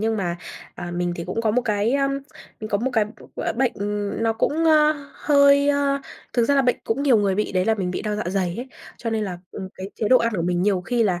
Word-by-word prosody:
nhưng 220 0 0
mà, 175 -3 -2 0.4
à, 175 - -6
mình 175 0 -1
thì 170 - -5
cũng 185 +6 -3
có 225 -2 +1
một 250 +4 +1
cái 210 0 0
á, 275 0 +2 0.5
mình 215 - -5
có 200 - +2
một 250 +5 -1
cái 220 -3 +3
b - - -9 0.3
gọi - - -3
là, - - +1
bệnh, 250 +1 +1
ừm, 205 +1 -3
nó 225 0 +2
cũng, 300 +8 0
a, 305 -1 +5 0.2
hơi 280 -1 +4
a, 280 -1 +2 0.3
thực 240 - +2
ra 280 - +2
là 275 - +4
bệnh 245 -1 +2
cũng 245 +5 -1
nhiều 270 -5 +5
người 200 -2 +2
bị, 210 +2 -1
đấy 185 -1 +1
là 225 - +3
mình 190 -4 -2
bị 180 - -3
đau 210 -1 -2
dạ 210 - -2
dày 185 -2 -1
ấy. 250 +3 -6 0.3
Cho 230 - -3
nên 220 -1 0
là, 180 -3 -5
ừm, 190 - -7
cái 190 +1 -7
chế 215 - -1
độ 255 - +7
ăn 230 0 0
của 170 - -1
mình 175 +1 0
nhiều 195 -2 +2
khi 235 +6 0
là 185 -5 +1
220 Hz, 285 wpm, -23 LUFS, 195-255 Hz, 0.5 s, độ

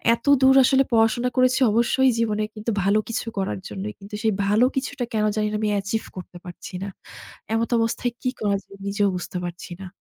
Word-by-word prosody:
এতদূর 265 +1 +4
আসলে 270 +1 +4
পড়াশোনা 225 +2 +3
করেছি 255 +1 +4
অবশ্যই 245 +3 +3
জীবনে 215 -2 0
কিন্তু 215 +2 -3
ভালো 200 +2 +3
কিছু 230 - -3
করার 190 -1 -2
জন্যই। 205 +2 -5
কিন্তু 200 +1 -9
সেই 220 -2 +2
ভালো 215 +5 +4
কিছুটা 270 -2 -2
কেন 215 -1 +1
জানি 210 - +1
না - - 0
আমি 215 - +1
অ্যাচিভ 200 +2 -1
করতে 180 -1 -9
পারছি 175 +1 -9
না। 200 - -4 0.7
এমতাবস্থায় 230 +1 0
কি 255 - +1
করা 200 -2 +1
যায় 195 - -15
নিজেও 200 0 +1
বুঝতে 180 +1 -5
পারছি 175 +1 -7
না। - - -7
220 Hz, 185 wpm, -23 LUFS, 200-245 Hz, 0.7 s, এতদূর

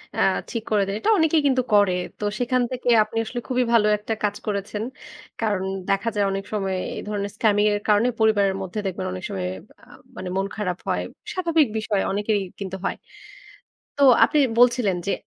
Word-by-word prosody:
অ্যাঁ 190 - +3 0.2
ঠিক 230 -2 -3
করে 210 -2 +3
দেয়। 195 - -2
এটা - - 0
অনেকেই 320 -1 +3
কিন্তু 260 -2 +3
করে। 205 -3 +5 0.3
তো - - -6 0.2
সেখান 250 0 +1
থেকে 250 -1 -2
আপনি 225 - -8
আসলে 240 +2 -4
খুবই 255 0 +2
ভালো 210 -2 +5
একটা 210 +2 -4
কাজ 205 0 +1
করেছেন। 205 +1 -3 0.6
কারণ 205 -4 0 0.3
দেখা 195 +3 +1
যায় 205 -1 +2
অনেক 195 0 -3
সময় 195 -2 -1 0.2
এই - - -4
ধরনের 200 -1 -3
scamming 210 -1 +3
এর 205 - 0
কারণে 210 +3 +4
পরিবারের 205 -3 +3
মধ্যে 190 +3 -4
দেখবেন 190 - -3
অনেক 90 - -7
সময় 90 -1 -3 0.4
আ - - -16 0.3
মানে 185 0 -5
মন 195 - +1
খারাপ 180 -5 -2
হয়। - - 0 0.3
স্বাভাবিক 330 -6 +2
বিষয় 215 -2 0
অনেকেরই 205 0 0 0.2
কিন্তু 190 -1 -5
হয়। - - -1 1.0
তো 285 - 0 0.2
আপনি 300 - +1 0.2
বলছিলেন 240 -6 +4
যে 200 - +1
210 Hz, 185 wpm, -23 LUFS, 195-235 Hz, 1.0 s, করে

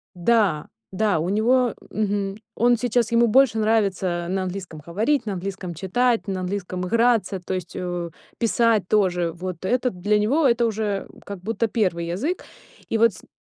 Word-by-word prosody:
Да, 180 -4 +2 0.2
да, 195 -3 +1
у 165 - -1
него, 235 +4 +2 0.2
мгм, 200 -2 -1 0.2
он 240 +1 +3
сейчас, 240 -1 0
ему 235 0 +4
больше 240 -1 +4
нравится 195 -5 +1
на 190 +1 -1
английском 185 -4 -6
говорить, 225 - 0
на 210 - -2
английском 190 -1 -5
читать, 230 +8 0
на 190 -1 -2
английском 185 -1 -3
играться, 230 -3 +2
то 180 +1 -5
есть 185 -2 -5
о 175 -1 -3
и 165 - -27
писать 230 -4 +2
тоже, 180 -5 +2
вот 180 0 -6
это 250 +4 +1
для 205 +4 +1
него 270 +9 +3
это 235 -1 +3
уже, 210 -3 -2
м, - - -17
как 200 -2 -7
будто 225 +5 -1
первый 185 -6 0
язык. 260 - -2 0.4
И 225 - +1
вот 230 -1 +4
с - - -14
н - - -20
205 Hz, 180 wpm, -23 LUFS, 180-230 Hz, 0.4 s, ему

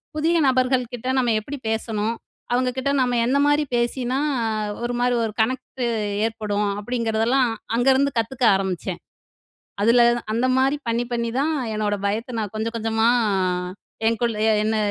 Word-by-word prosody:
புதிய 325 +2 +2
நபர்கள் 255 0 +2
கிட்ட 245 +1 -6
நம்ம 240 -3 +2
எப்படி 285 +6 -7
பேசணும்? 220 0 -1 0.4
அவங்க 250 +1 +2
கிட்ட 270 +2 0
நம்ம 245 -1 +1
என்ன 265 +4 +2
மாரி 290 +1 +3
பேசினா 245 +2 0 0.7
ஒரு 240 0 -2
மாரி 245 0 +2
ஒரு 220 - -2
கனெக்ட்டு 255 +1 -2 0.4
ஏற்படும்? 210 -2 -1
அப்டிங்கறதெல்லாம் 230 +2 +1 0.3
அங்கருந்து 265 +3 +3
கத்துக்க 245 +3 -2
ஆரம்பிச்சேன். 190 -2 -3 0.8
அதுல 235 +2 +5 0.3
அந்த 245 +3 +1
மாரி 270 +2 +2
பண்ணி, 230 +1 0
பண்ணி 235 -1 -1
தான் 315 +3 +1 0.2
என்னோட 210 -1 0
பயத்த 230 +4 -2
நான் 210 -3 -4
கொஞ்சம், 225 +2 -3
கொஞ்சமா 225 0 +1 0.2
அ - - +1 0.8
என்குள் 230 0 0 0.3
என்ன 220 +1 +1
235 Hz, 140 wpm, -22 LUFS, 220-255 Hz, 0.8 s, அதுல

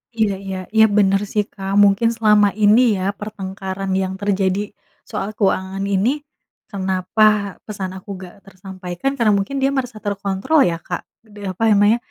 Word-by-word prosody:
Iya 215 -3 +1
iya. 190 -1 -4 0.2
Iya, 220 0 +7
bener 195 0 +3
sih, 210 - +1
Kak. 195 -1 -6
Mungkin 205 +3 +4
selama 210 -2 +4
ini 210 +4 +6
ya 185 - -3 0.2
pertengkaran 195 -2 -5
yang 190 0 -2
terjadi 195 -1 +1 0.5
soal 195 - -3
keuangan 195 -1 0
ini, 200 +3 +1 0.6
kenapa 190 +2 0 0.4
pesan 195 -3 -5
aku 190 +2 -12
nggak 185 +1 -11
tersampaikan, 185 +4 -5
karena 230 -4 +3
mungkin 200 +8 -3
dia 270 - +3
merasa 250 -5 -3
terkontrol 200 +8 0
ya, 165 - -4
Kak. - - -5 0.3
Deh 205 -1 -12
apa 185 - -12
ya 220 - +4
namanya, 205 +3 +4
200 Hz, 160 wpm, -20 LUFS, 190-215 Hz, 0.6 s, Iya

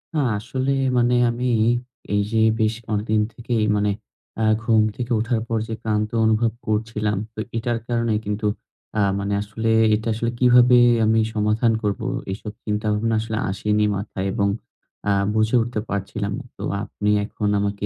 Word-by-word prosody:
না, - - +2 0.2
আসলে 130 +4 -2 0.3
মানে 120 0 +3
আমি 120 +2 -2 0.2
এই 115 - +3 0.4
এই 105 - +3
যে 115 - +2 0.2
বেশ 110 0 +2 0.2
অনেকদিন 105 +1 +1
থেকেই, 120 -1 -1
মানে 105 0 +1 0.5
আ - - +3 0.2
ঘুম 115 -2 +4
থেকে 125 0 -5
ওঠার 115 +1 0
পর 115 - 0
যে 115 - -4
ক্লান্ত 105 -1 0 0.2
অনুভব 110 +1 +2 0.2
করছিলাম, 105 -1 -1 0.2
তো - - -9 0.2
এটার 120 0 -1
কারণে 115 -2 0
কিন্তু 105 +1 -1 0.5
আ - - +4 0.2
মানে 100 +1 -2
আসলে 110 +2 -3 0.3
এটা 110 +2 -4
আসলে 115 +2 -1
কিভাবে 125 0 +6 0.3
আমি 110 +1 +3
সমাধান 110 +2 +2
করব, 100 -2 -1 0.3
এসব 105 +2 -6
চিন্তাভাবনা 105 +1 0
আসলে 110 0 -3
আসেনি 105 +2 +1
মাথায়। 95 -1 -4
এবং 100 -3 +1 0.6
আ - - +4 0.2
বুঝে 110 +2 +2
উঠতে 115 -1 -2
পারছিলাম 100 +1 -3
না। - - -10
তো - - -7 0.2
আপনি 105 -1 -3 0.2
এখন 105 0 -3
আমাকে 100 0 -2
110 Hz, 160 wpm, -22 LUFS, 105-115 Hz, 0.6 s, কিভাবে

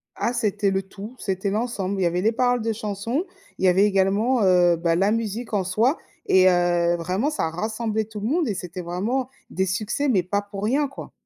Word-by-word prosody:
Ah 240 - -1
c'était 210 -4 0
le 195 0 0
tout, 205 +5 -10
c'était 190 0 -2
l'ensemble, 200 -3 -2
il - - +1
y - - +3
avait 175 +1 -1
les 220 +4 +3
paroles 245 +1 +1
de 225 0 -1
chansons, 220 - -3 0.3
il - - +1
y - - +6
avait 185 +3 +5
également, 205 +5 +2
heu, 180 -2 +5
bah, 165 0 0
la 195 +4 +2
musique 225 +1 -3
en 200 -2 +1
soi 220 - +1 0.3
et 185 0 +5
heu, 175 -1 +2
vraiment, 185 - -1
ça 290 - -1
rassemblait 220 +5 -2
tout 215 0 -8
le 205 - -3
monde 315 +4 +1
et 210 - -1
c'était 180 0 -6
vraiment 210 +10 -2 0.2
des 190 - -1
succès, 210 +9 -1
mais 195 -8 +3
pas 200 +3 -1
pour 200 -1 -8
rien, 275 +7 +1
quoi. 275 - -10
205 Hz, 220 wpm, -23 LUFS, 185-230 Hz, 0.3 s, y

